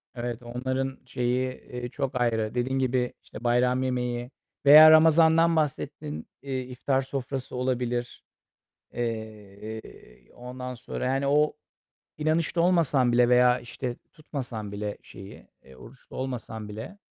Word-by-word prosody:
Evet, 120 Hz, 0 st, -4 dB
onların 130 Hz, +2 st, -3 dB
şeyi, 125 Hz, 0 st, -1 dB
eee, 125 Hz, -1 st, -7 dB
çok 130 Hz, -1 st, -3 dB
ayrı. 110 Hz, -2 st, 0 dB
Dediğin 130 Hz, +2 st, 0 dB
gibi, 125 Hz, -1 st, 0 dB
işte, 120 Hz, -, -11 dB
bayram 125 Hz, +2 st, +2 dB
yemeği 125 Hz, -1 st, -2 dB, 0.3 s
veya 155 Hz, +2 st, +10 dB
Ramazan'dan 160 Hz, +1 st, +6 dB
bahsettin, 80 Hz, -, -3 dB
eee, 135 Hz, -2 st, -3 dB
iftar 130 Hz, +2 st, -1 dB
sofrası 135 Hz, -1 st, -5 dB
olabilir. 125 Hz, -1 st, -2 dB, 0.7 s
Eee, 110 Hz, -, -7 dB
ondan 125 Hz, +1 st, -7 dB
sonra, 125 Hz, -, -5 dB
yani, 135 Hz, +2 st, 0 dB
o 150 Hz, +2 st, +3 dB, 0.6 s
inanışta 160 Hz, +2 st, +1 dB
olmasan 155 Hz, -8 st, +3 dB
bile 120 Hz, 0 st, +4 dB
veya, 125 Hz, 0 st, +5 dB
işte, 120 Hz, +1 st, -5 dB, 0.2 s
tutmasan 120 Hz, -9 st, -6 dB
bile 105 Hz, 0 st, -4 dB
şeyi, 95 Hz, +1 st, -12 dB, 0.2 s
eee, 65 Hz, -, -16 dB
oruçlu 120 Hz, -, -14 dB
olmasan 115 Hz, -5 st, -5 dB
bile 110 Hz, -, -8 dB
125 Hz, 125 wpm, -27 LUFS, 120-135 Hz, 0.7 s, veya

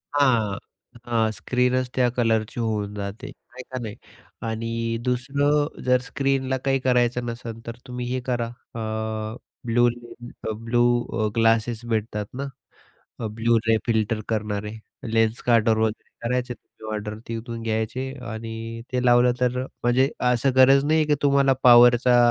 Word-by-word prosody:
हां, 115 Hz, -8 st, +3 dB, 0.5 s
हां, 115 Hz, -2 st, +1 dB
स्क्रीनच 125 Hz, +2 st, 0 dB
त्या 125 Hz, -1 st, +3 dB
कलरची 115 Hz, -1 st, +1 dB
होऊन 105 Hz, -3 st, -1 dB
जाते, 100 Hz, +1 st, -6 dB
आहे 130 Hz, +1 st, -12 dB
का 130 Hz, -, -3 dB
नाही 105 Hz, -2 st, -6 dB, 0.5 s
आणि 115 Hz, +1 st, -2 dB
दुसरं 140 Hz, +4 st, 0 dB
जर 125 Hz, 0 st, +4 dB
स्क्रीनला 135 Hz, 0 st, -1 dB
काही 135 Hz, 0 st, +2 dB
करायचं 125 Hz, -1 st, +1 dB
नसेल, 115 Hz, -1 st, -6 dB
तर 115 Hz, -, -5 dB
तुम्ही 125 Hz, 0 st, -5 dB
हे 130 Hz, -, 0 dB
करा. 120 Hz, -2 st, 0 dB
अ, 110 Hz, -2 st, -5 dB, 0.3 s
ब्लूू 120 Hz, +1 st, +3 dB
लेन्स 120 Hz, 0 st, -10 dB, 0.2 s
अ, -, -, 0 dB
ब्लू 120 Hz, +1 st, +2 dB, 0.4 s
अ, 110 Hz, -, +2 dB
ग्लासेस 115 Hz, 0 st, +2 dB
भेटतात 105 Hz, -1 st, -2 dB
ना, 135 Hz, +2 st, -4 dB, 0.8 s
अ, 110 Hz, -, -2 dB
ब्लू 115 Hz, +1 st, +3 dB
रे 110 Hz, -1 st, +4 dB
फिल्टर 110 Hz, -1 st, +1 dB
करणारे, 105 Hz, 0 st, -2 dB, 0.3 s
लेन्स 115 Hz, 0 st, +1 dB
कार्डरवर 115 Hz, -2 st, +3 dB
ऑर्डर -, -, +4 dB
वगैरे 110 Hz, +2 st, -7 dB
करायचे, 125 Hz, 0 st, -1 dB
तुम्ही 110 Hz, -2 st, -10 dB
ऑर्डर 105 Hz, 0 st, -5 dB
तिथून 115 Hz, 0 st, -5 dB
घ्यायचे 115 Hz, +4 st, -2 dB, 0.2 s
आणि 115 Hz, +1 st, -6 dB
ते 125 Hz, 0 st, 0 dB
लावलं, 120 Hz, 0 st, +5 dB
तर 125 Hz, 0 st, +1 dB
अ, -, -, -4 dB, 0.2 s
म्हणजे 130 Hz, +3 st, +3 dB, 0.2 s
असं 125 Hz, +2 st, +2 dB
गरज 135 Hz, +1 st, +6 dB
नाही 155 Hz, +1 st, +3 dB
आहे, 155 Hz, -, +2 dB
की 150 Hz, -, +3 dB
तुम्हाला 140 Hz, -1 st, +4 dB
पॉवरचा 120 Hz, 0 st, +7 dB
120 Hz, 155 wpm, -24 LUFS, 110-125 Hz, 0.8 s, पॉवरचा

